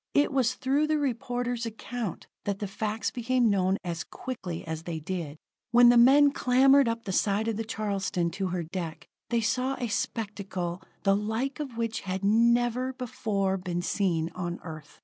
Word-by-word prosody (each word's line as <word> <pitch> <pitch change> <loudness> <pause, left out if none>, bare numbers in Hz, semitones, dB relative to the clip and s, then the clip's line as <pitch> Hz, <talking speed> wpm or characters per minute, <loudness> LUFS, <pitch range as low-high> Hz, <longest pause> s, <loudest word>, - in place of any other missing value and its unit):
It 285 0 +4
was 255 -2 +2
through 275 +4 +1
the 310 0 +2
reporter's 245 -3 -2
account 225 -2 -5 0.2
that 200 -1 -1
the 205 - -4
facts 215 +3 -2
became 245 -1 +2
known 190 -1 +2
as 170 -3 -3
quickly 190 -10 -6
as 160 -1 -4
they 165 -1 -4
did. 160 -2 -4 0.3
When 240 +1 +7
the 245 - +6
men 280 +4 +7
clambered 270 +1 +5
up 230 0 -2
the 195 - -4
side 205 +3 +1
of 225 - 0
the 225 - -2
Charleston 200 -5 -1
to 190 +2 -2
her 180 -1 -2
deck, 165 -1 -5 0.2
they 235 0 +1
saw 255 +4 0
a 245 - -3
spectacle 200 -4 -3 0.2
the 195 -1 +4
like 220 +7 -2
of 270 -6 -5
which 230 -1 -1
had 190 0 -4
never 240 +4 +3
before 205 -6 -1
been 175 -2 -3
seen 170 -6 0
on 175 -1 -4
Earth. 155 -2 -10
215 Hz, 175 wpm, -28 LUFS, 185-245 Hz, 0.3 s, When